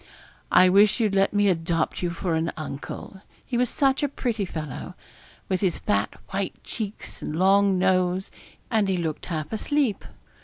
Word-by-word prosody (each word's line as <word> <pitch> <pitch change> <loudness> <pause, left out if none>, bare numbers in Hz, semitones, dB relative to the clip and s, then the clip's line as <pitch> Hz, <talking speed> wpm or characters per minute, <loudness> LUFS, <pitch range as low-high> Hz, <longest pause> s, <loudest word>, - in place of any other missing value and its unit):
I 185 - +7
wish 200 +5 +5
you'd 215 -4 +2
let 195 0 +3
me 205 0 +3
adopt 165 -2 0
you 175 - 0
for 170 0 -2
an 160 +1 0
uncle. 155 +5 -7 0.2
He 250 - -4
was 245 0 +2
such 270 +1 +2
a 290 - +1
pretty 235 -6 -2
fellow, 155 -6 -6 0.5
with 185 -1 -1
his 185 -4 +1
fat 100 +1 0 0.2
white 195 -1 -2
cheeks 215 -2 -6
and 150 - -4
long 195 +1 +4
nose, 185 0 +1 0.4
and 220 -3 +2
he 190 - +1
looked 160 -3 -3
half 160 +2 -4
asleep. 265 0 0
190 Hz, 165 wpm, -25 LUFS, 170-210 Hz, 0.5 s, I